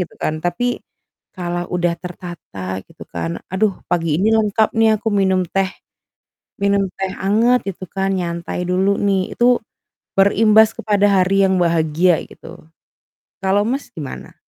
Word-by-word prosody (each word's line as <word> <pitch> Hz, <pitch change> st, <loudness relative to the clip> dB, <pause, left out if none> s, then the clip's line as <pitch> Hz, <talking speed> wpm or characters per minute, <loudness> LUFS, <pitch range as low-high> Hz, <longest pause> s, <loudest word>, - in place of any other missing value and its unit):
gitu 180 Hz, -, -4 dB
kan. 155 Hz, 0 st, -2 dB
Tapi, 210 Hz, +9 st, -1 dB, 0.6 s
kalau 175 Hz, -1 st, -3 dB
udah 175 Hz, -1 st, +1 dB
tertata 165 Hz, -, -7 dB
gitu -, -, -13 dB
kan, 85 Hz, 0 st, -4 dB
"Aduh 195 Hz, 0 st, +1 dB, 0.2 s
pagi 165 Hz, -3 st, +1 dB
ini 210 Hz, -, +3 dB
lengkap 220 Hz, 0 st, +2 dB
nih, 220 Hz, -1 st, +5 dB
aku 225 Hz, -, -1 dB
minum 190 Hz, -2 st, +2 dB
teh 195 Hz, +2 st, 0 dB, 0.9 s
minum 200 Hz, 0 st, +2 dB
teh 190 Hz, -1 st, -2 dB
anget," 225 Hz, +5 st, +3 dB
gitu 185 Hz, -, -9 dB
kan, 195 Hz, 0 st, -1 dB
"nyantai 170 Hz, -1 st, -3 dB
dulu 190 Hz, +2 st, +2 dB
nih." 195 Hz, -2 st, 0 dB
Itu, 245 Hz, +1 st, +4 dB, 0.6 s
berimbas 215 Hz, +2 st, +5 dB
kepada 205 Hz, -1 st, +2 dB, 0.2 s
hari 195 Hz, +2 st, +2 dB
yang 190 Hz, 0 st, +1 dB
bahagia 170 Hz, 0 st, +2 dB
gitu, 170 Hz, +2 st, -13 dB, 0.8 s
kalau 195 Hz, +1 st, +2 dB
Mas, 265 Hz, +4 st, -2 dB
gimana? 145 Hz, -5 st, -8 dB
190 Hz, 140 wpm, -19 LUFS, 175-205 Hz, 0.9 s, nih